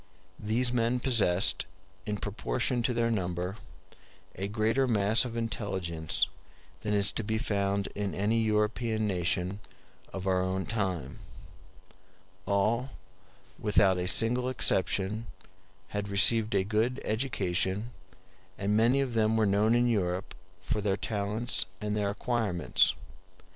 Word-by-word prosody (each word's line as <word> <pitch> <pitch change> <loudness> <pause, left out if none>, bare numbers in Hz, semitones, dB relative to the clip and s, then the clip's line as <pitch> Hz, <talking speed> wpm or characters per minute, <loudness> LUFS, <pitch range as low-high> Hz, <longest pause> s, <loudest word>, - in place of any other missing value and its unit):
These 120 +4 0
men 120 +1 +1
possessed, 110 -8 +2 0.4
in 105 -1 -2
proportion 120 +4 -2
to 120 - 0
their 115 0 +1
number, 90 -1 -2 0.8
a 95 - -4
greater 110 +5 +1
mass 110 0 +4
of 115 -1 -5
intelligence 95 -8 -1 0.5
than 105 +2 -1
is 100 -1 +4
to 115 - -2
be 110 +1 -1
found 100 -2 -1
in 100 -1 -3
any 110 +4 +1
European 110 +1 0
nation 90 0 -1 0.5
of 95 -1 -6
our 95 -1 +2
own 95 +1 -2
time. 95 - -3 1.3
All, 110 +6 +1 0.7
without 100 -3 +3
a 90 - -2
single 120 +6 +2
exception, 105 -2 +1 0.6
had 105 0 -4
received 105 +2 +4
a 95 - +3
good 110 +6 0
education, 105 -2 -1 0.7
and 100 +2 0
many 120 +5 +3
of 130 -3 -2
them 110 0 +2
were 110 - +3
known 105 +3 +3
in 120 0 +3
Europe 95 -4 -1 0.3
for 105 - -1
their 100 -1 0
talents 105 +3 -1
and 105 0 -2
their 105 -1 0
acquirements. 100 -6 +1
105 Hz, 125 wpm, -29 LUFS, 95-115 Hz, 1.3 s, mass